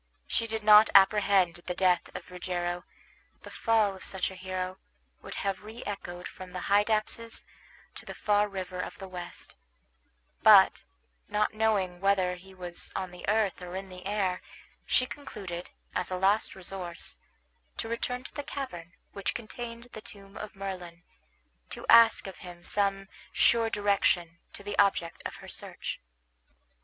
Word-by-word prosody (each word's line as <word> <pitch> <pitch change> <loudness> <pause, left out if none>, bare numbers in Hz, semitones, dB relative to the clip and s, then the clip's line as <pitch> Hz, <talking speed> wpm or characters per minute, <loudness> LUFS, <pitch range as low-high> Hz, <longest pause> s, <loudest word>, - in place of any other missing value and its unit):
She 230 - 0
did 220 -1 -3
not 210 +1 +8
apprehend 195 -3 +5
the 180 - -2
death 180 -2 +2
of - - -8
Rogero. 175 -1 -3 0.6
The - - -10
fall 220 -4 +2
of 190 - -12
such 190 -1 0
a - - -9
hero 185 0 -4 0.4
would - - -8
have 195 -1 -1
reechoed 205 -5 -7
from 185 -1 -10
the 180 - -4
Hydaspes 215 +3 +1 0.5
to - - -12
the - - -6
farthest 210 0 +2
river 185 -1 -5
of - - -5
the 195 - -8
West; 180 -1 -8 0.8
but, - - +7 0.4
not 210 +1 +1
knowing 205 -5 +1
whether 195 -2 +3
he 185 +2 -12
was 175 -1 -6
on 185 -1 -3
the 180 +2 -6
earth 210 -3 +1
or 180 0 -7
in 190 0 -5
the 180 0 -10
air, 195 -3 0 0.5
she 255 - +3
concluded, 195 -11 -7 0.2
as 180 - -1
a 185 - -2
last 200 +4 +2
resource, 180 - -6 0.6
to - - -3
return 250 +2 -2
to - - -8
the 290 - -3
cavern 180 -13 -6 0.2
which 200 - -2
contained 235 +1 -7
the 220 - -7
tomb 200 -2 -13
of 215 0 -7
Merlin, 180 -3 -6 0.7
to - - -6
ask 230 -1 +7
of 195 - -8
him 175 -1 -10
some 195 0 +1 0.2
sure 230 -1 +4
direction 190 -5 +1
to 200 - -9
the 205 0 -4
object 195 -4 +2
of - - -10
her - - -12
search. - - -5
195 Hz, 155 wpm, -29 LUFS, 180-210 Hz, 0.8 s, not